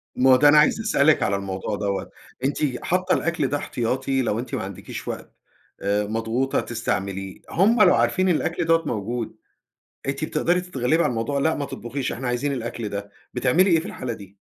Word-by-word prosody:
ما 130 +1 +4
هو - - +9
ده 145 +3 +6
أنا 150 - +6
عايز 150 +8 +5
أسألِك 155 -9 +3
على 100 - +1
الموضوع 100 +1 -3
دوّة، 100 -1 -2 0.3
أنتِ 135 -1 -1
حاطة 185 +1 +1
الأكل 165 -5 0
ده 145 - 0
احتياطي 130 +1 -1
لو 115 -3 0
أنتِ 130 +3 -4
ما 115 - -3
عندكيش 95 -1 -7
وقت - - -6 0.5
آآ، 100 +1 +1
مضغوطة 115 +5 0
تستعمليه، 100 -4 -3
هم 215 +6 +3
لو - - +6
عارفين 120 +11 +2
الأكل 175 0 0
دوَّة 165 0 +3
موجود، 115 -1 -3 0.7
أنتِ 140 +3 -1
بتقدري 175 +3 +1
تتغلّبي 160 -3 0
على - - +1
الموضوع، 120 +4 -1
"لأ 160 +3 +2
ما 145 - -3
تطبخيش، 130 0 -4
إحنا 130 +1 -4
عايزين 125 +4 0
الأكل 115 -3 -4
ده." 100 0 -5 0.2
بتعملي 165 +10 +3
إيه 165 -2 +5
في 170 - -7
الحالة 130 - -4
دي؟ 100 -3 -11
130 Hz, 185 wpm, -24 LUFS, 110-155 Hz, 0.7 s, هو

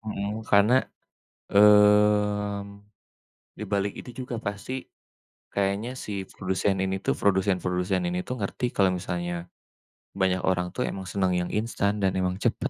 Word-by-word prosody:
Mhm, 105 0 -4
karena, 105 +5 +5 0.7
mmm, 105 0 +4 0.9
di - - -5
balik 100 0 0
itu - - -10 0.2
juga 125 - -5
pasti, 100 +4 -4 0.8
kayaknya 100 +4 0
si - - -6 0.2
produsen 95 +1 -1
ini 95 0 -1
tuh - - +2
produsen-produsen 95 -1 +1
ini 90 +1 -2
tuh 125 - -3
ngerti 105 +5 -2
kalau 95 -2 +4
misalnya, 85 0 -3 0.9
banyak 95 -1 +2
orang 90 -1 0
tuh 125 - 0
emang 95 -1 -6
seneng 95 -2 +1
yang 90 - -2
instan, 110 -3 0
dan 95 - +3
emang 90 0 0
cepet - - 0
100 Hz, 135 wpm, -26 LUFS, 95-105 Hz, 0.9 s, karena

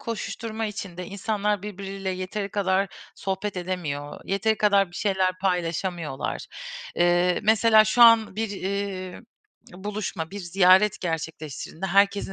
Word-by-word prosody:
koşuşturma 225 -1 -4
içinde 180 -4 -6
insanlar 205 0 -1
birbiriyle 195 -1 -5
yeteri 185 +2 -4
kadar 195 -1 +1 0.3
sohbet 190 +1 -3
edemiyor, 165 -6 -4
yeteri 210 +3 +1
kadar 200 -3 +3
bir 175 - -10
şeyler 190 -2 +1
paylaşamıyorlar. 175 -4 -2 0.5
Eee, 175 +1 +3
mesela 220 0 +5
şu 240 +3 +4
an 230 -3 +6
bir, 220 -1 -2
eee, 195 -1 -4 0.5
buluşma, 190 -4 -4
bir 200 - -6
ziyaret 190 +3 +4
gerçekleştirdiğinde 160 0 -4
herkesin 200 +1 +2
195 Hz, 115 wpm, -25 LUFS, 180-210 Hz, 0.5 s, an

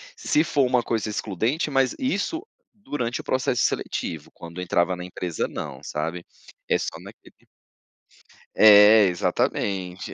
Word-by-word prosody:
se 160 - +1
for 145 -4 +1
uma 125 -1 +1
coisa 110 -2 -2
excludente, 110 - -2
mas 135 -1 +1
isso 275 - -2 0.3
durante 135 - -4
o - - -7
processo 130 -2 0
seletivo, 80 -1 -3
quando 85 +2 -9
entrava 90 0 +1
na 90 - -8
empresa 90 -2 -4
não, 65 -2 -7
sabe. 80 +4 -4 0.5
É - - +3
só - - -5
naquele - - -16 1.1
É, 105 0 +8
exatamente. 90 +1 -2
105 Hz, 130 wpm, -24 LUFS, 90-130 Hz, 1.1 s, É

